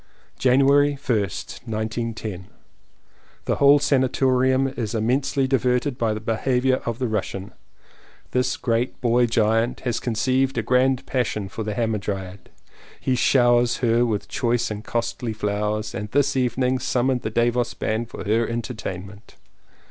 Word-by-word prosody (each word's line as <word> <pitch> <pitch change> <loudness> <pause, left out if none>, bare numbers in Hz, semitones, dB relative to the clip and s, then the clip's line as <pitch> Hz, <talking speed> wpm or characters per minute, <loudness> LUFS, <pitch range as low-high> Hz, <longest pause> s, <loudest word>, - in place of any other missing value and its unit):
January 140 +3 +4
1st, 115 -8 -3
1910. 110 -3 -4 1.0
The - - 0
whole 140 +1 +6
sanatorium 130 -1 +2
is 115 -4 -4
immensely 135 +5 +1
di 135 0 +3
verted 125 +2 0
by 110 -2 +1
the - - -4
behaviour 125 +4 +1
of 115 -1 -2
the 125 -1 -1
Russian. 100 -2 -3 0.8
This 125 0 0
great 120 0 -1
boy 120 0 +3
giant 115 +1 +1
has 120 -3 -1
conceived 130 +3 0
a 115 - 0
grand 130 +2 +2
passion 110 -6 -2
for 110 - -6
the 105 -1 -3
Hamadryad. 100 -4 -3 0.5
He 130 - 0
showers 120 -1 +3
her 120 -1 +2
with 110 -4 -1
choice 120 -1 0
and 105 0 -5
costly 115 0 -3
flowers 105 0 -2
and 105 -1 -5
this 140 +3 +1
evening 125 0 +1
summoned 125 0 0
the 110 - -3
Davos 120 +1 0
band 110 +2 -2
for - - -7
her 110 +2 +1
entertainment. 105 -4 -6
120 Hz, 140 wpm, -23 LUFS, 110-130 Hz, 1.0 s, whole